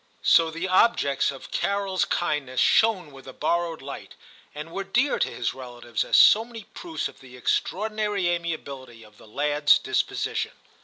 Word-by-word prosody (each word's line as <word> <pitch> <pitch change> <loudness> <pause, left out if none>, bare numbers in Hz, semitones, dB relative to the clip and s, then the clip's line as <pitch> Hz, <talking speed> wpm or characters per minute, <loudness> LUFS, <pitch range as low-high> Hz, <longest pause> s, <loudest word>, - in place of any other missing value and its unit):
So 165 -1 +5
the 165 +3 -4
objects 185 - +2
of 135 -2 -9
CaroFs 200 -2 -1
kindness 145 -7 -1
shone 195 -9 +3
with 135 -1 -14
a 130 - -9
borrowed 165 0 -1
light, 140 0 -9 0.4
and 150 +2 -7
were 195 - -4
dear 245 +9 +1
to - - +1
his 120 - -3
relatives 120 -3 -5
as - - +2
so 220 - +7
many 230 -2 -10
proofs 335 -2 -4
of - - -15
the 125 -1 -14
extraordinary 210 - -1
amiability 140 -9 -4
of 105 -1 -19
the - - -16
lad*s 145 +5 +3
disposition. - - -2
160 Hz, 160 wpm, -25 LUFS, 135-195 Hz, 0.4 s, so